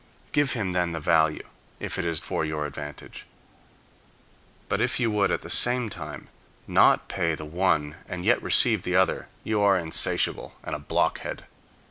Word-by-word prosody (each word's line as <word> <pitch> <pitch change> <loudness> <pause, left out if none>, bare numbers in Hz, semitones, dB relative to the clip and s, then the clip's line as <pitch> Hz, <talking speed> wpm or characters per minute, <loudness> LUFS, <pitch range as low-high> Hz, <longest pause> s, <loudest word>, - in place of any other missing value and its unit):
Give 145 -2 +2
him 105 -6 -2
then 90 -1 0
the 80 - -3
value, 80 0 +2 0.3
if - - -3
it 90 - -2
is 85 -1 -1
for - - -3
your 75 -1 -2
advantage. 75 0 -8 1.4
But - - -1
if - - +1
you 115 -3 +1
would, 105 -2 +2
at - - -1
the - - -8
same 120 -2 +2
time, 75 -4 -8 0.4
not - - +4
pay 80 -1 -1
the 75 - -8
one 80 -2 0
and 90 0 -5
yet 120 +3 +3
receive 110 -6 +4
the 90 0 -2
other, 95 0 +2 0.2
you 110 -1 0
are 100 -1 +4
insatiable, 80 -3 +1
and - - -5
a 75 - -3
blockhead. 75 - -2
90 Hz, 170 wpm, -26 LUFS, 75-105 Hz, 1.4 s, not